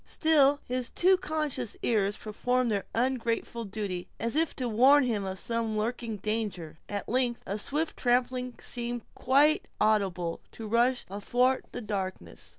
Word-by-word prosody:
Still, 290 -3 +3
his 250 -1 -2
too 375 +2 +4
conscious 305 - -2
ears 205 -3 +1
performed 245 +3 0
their 200 -2 -1
ungrateful 235 -1 -1
duty, 195 -3 -4
as 230 +3 -2
if 320 0 +1
to 255 - -2
warn 260 +6 +6
him 220 -6 -1
of 190 0 -4
some 230 0 -2
lurking 225 0 -2
danger. 200 -7 -3
At 205 -1 -4
length, 245 0 0
a 200 +2 -3
swift 300 +8 -1
trampling 250 0 +1
seemed, 240 -1 -2
quite 285 +4 +3
audibly, 190 -6 +1 0.2
to 225 - -7
rush 240 +3 +2
athwart 245 +7 +1
the 245 - -5
darkness. 195 -4 -5
235 Hz, 150 wpm, -29 LUFS, 210-255 Hz, 0.2 s, warn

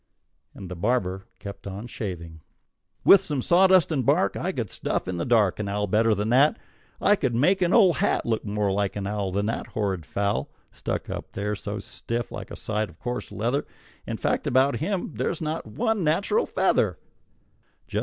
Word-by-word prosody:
And 95 - -8
the 90 - -6
barber 95 -2 -1
kept 100 0 -9
on 100 +3 -6
shaving. 85 -8 -6 0.6
"With 195 - +9
some 150 -8 -3
sawdust 185 +4 +5
and 140 -5 +1
bark - - +2
I - - -1
could - - -4
stuff - - -2
in 90 -1 -3
the 85 - -2
dark 110 -6 +3
An 105 -2 -2
owl 105 +1 0
better 110 +2 +3
than 105 +2 -1
that. 135 +5 +4 0.4
I 205 - +4
could 130 - -1
make 185 +10 +3
an 175 -1 +3
old 190 - +5
hat - - +1
Look 115 -1 0
more 105 -1 0
like 100 0 0
an 100 -1 -3
owl 100 -1 -2
Than 100 +2 0
that 115 - -2
horrid 95 - -2
fowl, 100 -8 -1 0.2
Stuck - - -4
up - - -6
there 105 +1 -2
so 105 +1 -5
stiff 115 +3 -4
like - - -7
a - - -7
side 110 -1 -2
of - - -17
coarse 125 0 -4
leather. 120 +7 -1 0.4
In - - -3
fact, - - -1
about 130 +2 +3
him 185 +3 -2
there's 170 - -1
not 160 +1 -3
one 220 -4 0
natural 195 - +1
feather." - - +1
110 Hz, 190 wpm, -25 LUFS, 100-150 Hz, 0.6 s, With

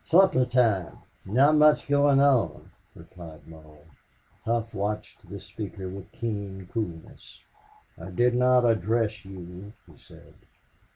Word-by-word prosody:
"Supper 175 -7 +4
time. 115 -7 0 0.3
Not 135 +10 +3
much 150 0 +4
going 145 -1 +3
on," 140 -4 +1 0.2
replied 85 -4 -13
Mull. 80 -2 -16 0.6
Hough 115 0 -2
watched 105 +2 -5
this - - -9
speaker 95 -3 -7
with 100 +2 -10
keen 100 -5 -6
coolness. 90 -9 -7 0.6
"I 85 +3 -9
did 120 +6 +1
not 125 0 +3
address 110 -1 0
you," 95 +1 -11
he - - -20
said. - - -18
110 Hz, 120 wpm, -26 LUFS, 95-125 Hz, 0.6 s, Supper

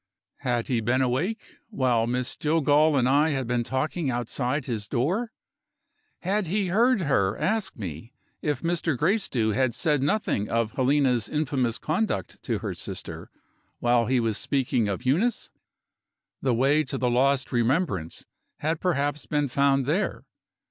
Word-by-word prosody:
Had 120 -2 -1
he 120 -3 0
been 125 +4 +2
awake, 150 - -2
while 125 - +1
Miss 125 +1 -1
Jillgall 150 -1 +3
and 125 -1 +3
I 145 +4 +4
had 135 -4 -1
been 120 0 0
talking 140 +5 -2
outside 125 +3 -2
his 110 -4 -3
door? 185 - -1 0.9
Had 195 +1 0
he 195 +2 0
heard 230 +4 +3
her 100 - +1
ask 215 -1 -1
me 95 - -7 0.3
if 150 +1 -2
Mr. 165 -4 0
Gracedieu 155 - +1
had 120 +2 +1
said 150 +2 +1
nothing 145 - 0
of 115 -1 0
Helena's 130 -3 +2
infamous 135 -6 0
conduct 155 - -2
to - - -2
her - - -2
sister, - - -7 0.5
while 120 -1 +2
he 130 0 +2
was 115 -3 0
speaking 125 -5 0
of 100 +5 -3
Eunice? 185 - +1 0.9
The 130 -3 +1
way 140 +5 +3
to 135 - -3
the 125 -1 0
lost 130 +2 +2
remembrance 120 - 0 0.3
had 155 +1 -1
perhaps 145 -4 -1
been 145 -2 0
found 135 +1 +2
there. 170 +10 -1
135 Hz, 150 wpm, -26 LUFS, 120-155 Hz, 0.9 s, I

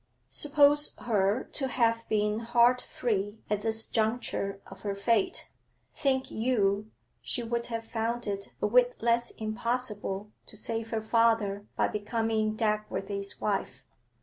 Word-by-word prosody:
Suppose 295 0 +4
her 210 0 +1
to 270 - 0
have 230 -2 +1
been 210 0 +1
heart 240 +2 +4
free 205 -2 -2
at 210 -1 +1
this 225 +1 0
juncture 220 -3 -1
of - - -12
her 200 -1 -2
fate, 205 +1 +1 0.5
think 265 -2 0
you 215 -3 +1 0.3
she 240 - -3
would 235 0 -2
have 230 -1 -4
found 230 +1 -2
it 200 -1 -3
a - - +5
whit 245 +3 +3
less 235 0 +2
impossible 215 -3 -3 0.2
to 215 - -9
save 225 +1 -3
her 225 -1 -1
father 220 -3 +2
by - - +2
becoming 215 0 -1
Dagworthy's 210 -2 -2
wife. 200 -2 -2
225 Hz, 135 wpm, -29 LUFS, 210-240 Hz, 0.5 s, a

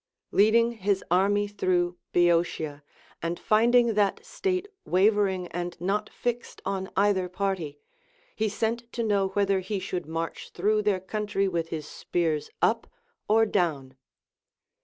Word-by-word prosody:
Leading 230 +3 +4
his 200 -3 -1
army 205 +3 +3
through 180 -3 0 0.2
Boeotia, 170 -4 +1 0.4
and 170 +1 -2
finding 235 +3 +4
til 210 - 0
at 200 -1 +1
state 370 0 -2 0.2
wavering 190 -1 +2
and 175 0 -5
not 205 +4 -1
fixed 240 0 -4
on 190 -1 -2
either 195 -2 +2
party, 180 -6 -2 0.6
he 220 - 0
sent 230 +3 -2
to 235 - -1
know 200 -3 +2
whether 200 -1 +2
he 190 +2 -3
should 185 -3 -4
march 165 +1 -4
through 210 +4 +1
their 205 -3 +1
country 200 0 -1
with 170 -3 -2
his 155 -3 -4
spears 160 -4 -2
up - - +2 0.4
or 225 +1 +5
down. 145 -10 -1
195 Hz, 140 wpm, -27 LUFS, 175-210 Hz, 0.6 s, or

